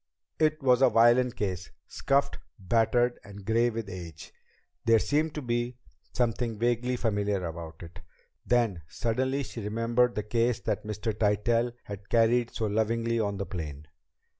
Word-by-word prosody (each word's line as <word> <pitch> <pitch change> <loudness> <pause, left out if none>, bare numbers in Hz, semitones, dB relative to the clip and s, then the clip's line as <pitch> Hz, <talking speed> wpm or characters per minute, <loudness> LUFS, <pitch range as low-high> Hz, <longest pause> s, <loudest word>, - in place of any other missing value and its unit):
It 155 -1 +2
was 125 -1 +4
a - - +7
violin 120 +2 +5
case, 95 -7 -4 0.2
scuffed, 140 +1 0 0.2
battered, 120 +4 +1
and 100 -1 -11
gray 115 +3 +3
with 115 -2 -5
age. 85 -4 -9 0.5
There 115 -1 +5
seemed 150 +7 0
to 150 - -4
be 120 0 -2 0.3
something 120 -2 -1
vaguely 120 +2 0
familiar 105 -5 -1
about 80 0 -7
it; 85 +1 -11 0.4
then, 115 -8 +1
suddenly, 130 - -1
she 120 - -7
remembered 115 +3 +1
the 105 - -1
case 115 +2 +1
that - - -2
Mr. 105 +1 -2
Tytell 115 +3 +1
had 100 -1 -9
carried 120 +1 +3
so 110 - -3
lovingly 115 +2 0
on 100 -2 -1
the 100 - -3
plane. 75 -5 -6
115 Hz, 150 wpm, -28 LUFS, 100-120 Hz, 0.5 s, a